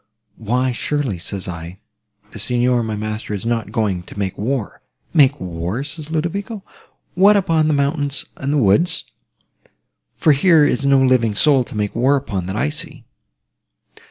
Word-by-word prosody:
Why, 125 Hz, +4 st, 0 dB
surely, 125 Hz, -, -2 dB
said 95 Hz, +2 st, -3 dB
I, 85 Hz, 0 st, -7 dB, 0.5 s
the -, -, -9 dB
Signor, 125 Hz, 0 st, +1 dB
my 110 Hz, -2 st, -3 dB
master, 110 Hz, 0 st, -4 dB
is 100 Hz, -, -6 dB
not 115 Hz, -3 st, -1 dB
going 105 Hz, -6 st, -1 dB
to 90 Hz, -, -13 dB
make 95 Hz, -2 st, -2 dB
war? 115 Hz, +1 st, -3 dB, 0.3 s
'Make 145 Hz, -3 st, +4 dB
war!' 90 Hz, +7 st, -4 dB
said 150 Hz, +1 st, -5 dB
Ludovico, 190 Hz, +6 st, -3 dB, 0.5 s
'what, 200 Hz, +3 st, +5 dB
upon 165 Hz, -5 st, +2 dB
the 155 Hz, -, +2 dB
mountains 140 Hz, 0 st, 0 dB
and 140 Hz, 0 st, -3 dB
the 150 Hz, -, +2 dB
woods? 140 Hz, -, +2 dB, 1.1 s
for 155 Hz, -, +3 dB
here 155 Hz, +1 st, +5 dB
is 135 Hz, -, 0 dB
no 140 Hz, -1 st, +5 dB
living 120 Hz, -5 st, +2 dB
soul 135 Hz, +2 st, +4 dB
to 110 Hz, -, -8 dB
make 105 Hz, -1 st, -2 dB
war 130 Hz, +5 st, +3 dB
upon 100 Hz, -10 st, -3 dB
that 95 Hz, -, -4 dB
I 145 Hz, +7 st, 0 dB
see. 150 Hz, -4 st, -5 dB
130 Hz, 160 wpm, -19 LUFS, 105-150 Hz, 1.1 s, what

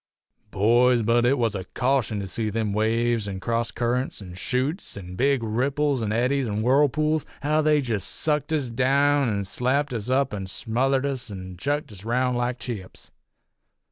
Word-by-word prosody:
"Boys, 120 Hz, +4 st, +3 dB
but 120 Hz, +2 st, +3 dB
it 135 Hz, +3 st, +3 dB
was 115 Hz, -4 st, +1 dB
a 95 Hz, -2 st, -4 dB
caution 125 Hz, -5 st, +1 dB
to 95 Hz, -, -5 dB
see 110 Hz, +3 st, -1 dB
them 105 Hz, -1 st, -1 dB
waves, 115 Hz, +1 st, +1 dB
an' 95 Hz, -1 st, -4 dB
cross 115 Hz, +3 st, -1 dB
currents, 125 Hz, +2 st, -1 dB
an' 95 Hz, -3 st, -9 dB
chutes, 125 Hz, -, -2 dB
an' 90 Hz, -2 st, -8 dB
big 135 Hz, +2 st, +2 dB
ripples, 135 Hz, +4 st, 0 dB
an' 105 Hz, -2 st, -1 dB
eddies, 125 Hz, +4 st, +1 dB
an' 105 Hz, 0 st, -2 dB
whirlpools, 150 Hz, +4 st, +2 dB, 0.2 s
how 155 Hz, +2 st, +2 dB
they 150 Hz, -1 st, +3 dB
jest 110 Hz, -7 st, -1 dB
sucked 150 Hz, -1 st, -1 dB
us 145 Hz, -6 st, -1 dB
down 140 Hz, +2 st, +2 dB
an' 100 Hz, -2 st, -1 dB
slapped 130 Hz, +7 st, 0 dB
us 115 Hz, 0 st, -4 dB
up 130 Hz, -1 st, +1 dB
an' 95 Hz, -2 st, -4 dB
smothered 130 Hz, +7 st, 0 dB
us 130 Hz, -4 st, -2 dB
an' 95 Hz, -2 st, -7 dB
chucked 145 Hz, +9 st, -2 dB
us 100 Hz, -1 st, -10 dB
roun' 125 Hz, +3 st, +1 dB
like 120 Hz, +1 st, -1 dB
chips. 105 Hz, -8 st, -7 dB
120 Hz, 175 wpm, -25 LUFS, 110-140 Hz, 0.2 s, Boys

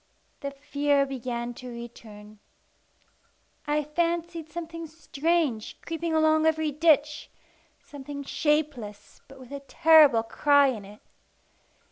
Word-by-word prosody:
The 280 Hz, -, -4 dB
fear 285 Hz, 0 st, 0 dB
began 245 Hz, -2 st, -4 dB
to 250 Hz, +1 st, -10 dB
return. 215 Hz, -3 st, -11 dB, 1.3 s
I 300 Hz, +1 st, +1 dB
fancied 335 Hz, +1 st, -2 dB
something 330 Hz, -1 st, -6 dB
strange 310 Hz, -5 st, -1 dB
creeping 330 Hz, 0 st, -3 dB
along 315 Hz, 0 st, +3 dB
every 315 Hz, -1 st, +1 dB
ditch 300 Hz, 0 st, +2 dB, 0.5 s
something 285 Hz, 0 st, -8 dB
shapeless, 280 Hz, -9 st, -2 dB
but 270 Hz, -1 st, -15 dB
with 255 Hz, 0 st, -13 dB
a 280 Hz, -, -5 dB
terrible 290 Hz, -4 st, +5 dB
cry 285 Hz, +4 st, +3 dB
in 215 Hz, -6 st, -5 dB
it. 205 Hz, +2 st, -14 dB
290 Hz, 110 wpm, -26 LUFS, 250-315 Hz, 1.3 s, terrible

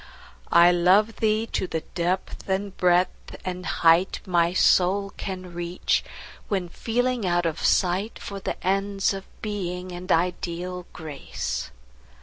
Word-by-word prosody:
I 170 Hz, +1 st, +7 dB
love 190 Hz, +5 st, +4 dB
thee 220 Hz, 0 st, +1 dB
to 185 Hz, -, -1 dB
the 160 Hz, -, -2 dB
depth 180 Hz, +2 st, -2 dB
and 195 Hz, +1 st, -1 dB
breadth 180 Hz, 0 st, +1 dB
and 180 Hz, 0 st, -4 dB
height 170 Hz, +3 st, +3 dB
My 170 Hz, -3 st, +2 dB
soul 195 Hz, +2 st, +3 dB
can 185 Hz, -2 st, -6 dB
reach, 175 Hz, +1 st, 0 dB, 0.4 s
when 190 Hz, -4 st, -1 dB
feeling 245 Hz, +4 st, -1 dB
out 175 Hz, 0 st, +1 dB
of 165 Hz, -1 st, -2 dB
sight 190 Hz, +4 st, +2 dB
For 200 Hz, -1 st, -7 dB
the -, -, -4 dB
ends 195 Hz, +1 st, +1 dB
of 195 Hz, 0 st, -6 dB, 0.2 s
Being 185 Hz, -4 st, -4 dB
and 180 Hz, +1 st, -5 dB
ideal 180 Hz, +1 st, -1 dB
Grace. 155 Hz, -4 st, -5 dB
180 Hz, 130 wpm, -25 LUFS, 175-195 Hz, 0.4 s, I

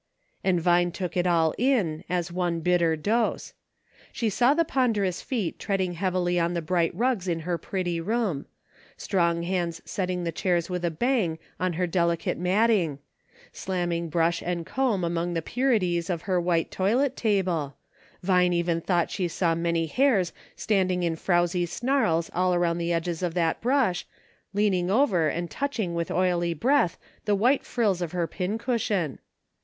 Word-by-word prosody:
And 185 Hz, -2 st, +2 dB
Vine 175 Hz, +1 st, +3 dB
took 180 Hz, 0 st, -5 dB
it 180 Hz, 0 st, +1 dB
all 165 Hz, -2 st, +3 dB
in, 220 Hz, -, +1 dB
as 175 Hz, -1 st, -1 dB
one 175 Hz, -2 st, -1 dB
bitter 170 Hz, -1 st, +2 dB
dose. 215 Hz, +9 st, -1 dB, 0.6 s
She 225 Hz, -4 st, -1 dB
saw 245 Hz, +7 st, +3 dB
the 335 Hz, +1 st, +2 dB
ponderous 215 Hz, -, 0 dB
feet 220 Hz, -10 st, -3 dB
treading 190 Hz, -3 st, -1 dB
heavily 180 Hz, 0 st, 0 dB
on 170 Hz, +1 st, 0 dB
the 170 Hz, -, -1 dB
bright 170 Hz, 0 st, +1 dB
rugs 230 Hz, -3 st, 0 dB
in 165 Hz, -2 st, -1 dB
her 170 Hz, +1 st, -2 dB
pretty 175 Hz, -3 st, -2 dB
room; 200 Hz, -6 st, -1 dB, 0.5 s
strong 170 Hz, -3 st, 0 dB
hands 170 Hz, -2 st, -2 dB
set 185 Hz, -2 st, -2 dB
ting 180 Hz, -1 st, -2 dB
the 170 Hz, -, -1 dB
chairs 175 Hz, +1 st, 0 dB
with 180 Hz, -1 st, -3 dB
a 170 Hz, -, +2 dB
bang 185 Hz, -2 st, 0 dB, 0.2 s
on 185 Hz, -1 st, 0 dB
her 180 Hz, +3 st, 0 dB
delicate 170 Hz, -2 st, 0 dB
matting; 185 Hz, -4 st, +2 dB, 0.6 s
slamming 175 Hz, -3 st, -2 dB
brush 165 Hz, +1 st, +1 dB
and 175 Hz, -1 st, -2 dB
comb 245 Hz, -7 st, 0 dB
among 170 Hz, +1 st, -1 dB
the 165 Hz, -, 0 dB
purities 195 Hz, -8 st, 0 dB
of 170 Hz, -3 st, -2 dB
her 185 Hz, -3 st, +1 dB
white 170 Hz, -1 st, 0 dB
toilet 245 Hz, +8 st, +1 dB
table; 180 Hz, -, 0 dB, 0.5 s
Vine 180 Hz, -1 st, +3 dB
even 170 Hz, -1 st, 0 dB
thought 175 Hz, -1 st, 0 dB
she 180 Hz, -, -1 dB
saw 170 Hz, 0 st, 0 dB
many 170 Hz, 0 st, 0 dB
hairs 210 Hz, -, +2 dB, 0.2 s
standing 185 Hz, -4 st, +1 dB
in 165 Hz, -1 st, 0 dB
frowzly 175 Hz, +1 st, +1 dB
snarls 220 Hz, -7 st, 0 dB
all 180 Hz, 0 st, +2 dB
around 175 Hz, -1 st, +1 dB
the 170 Hz, 0 st, -1 dB
edges 170 Hz, 0 st, -1 dB
of 175 Hz, -2 st, -2 dB
that 165 Hz, -2 st, 0 dB
brush, 245 Hz, -7 st, +1 dB, 0.4 s
leaning 195 Hz, -3 st, +1 dB
over 195 Hz, -, +3 dB
and 170 Hz, +3 st, -3 dB
touching 235 Hz, -11 st, -2 dB
with 170 Hz, 0 st, -2 dB
oily 175 Hz, -2 st, +1 dB
breath 240 Hz, -, +2 dB, 0.3 s
the 210 Hz, -1 st, +2 dB
white 250 Hz, +7 st, +2 dB
frills 205 Hz, -7 st, 0 dB
of 175 Hz, -1 st, -3 dB
her 175 Hz, -2 st, 0 dB
pin 185 Hz, +5 st, -3 dB
cushion. 215 Hz, -, -1 dB
180 Hz, 165 wpm, -26 LUFS, 170-200 Hz, 0.6 s, Vine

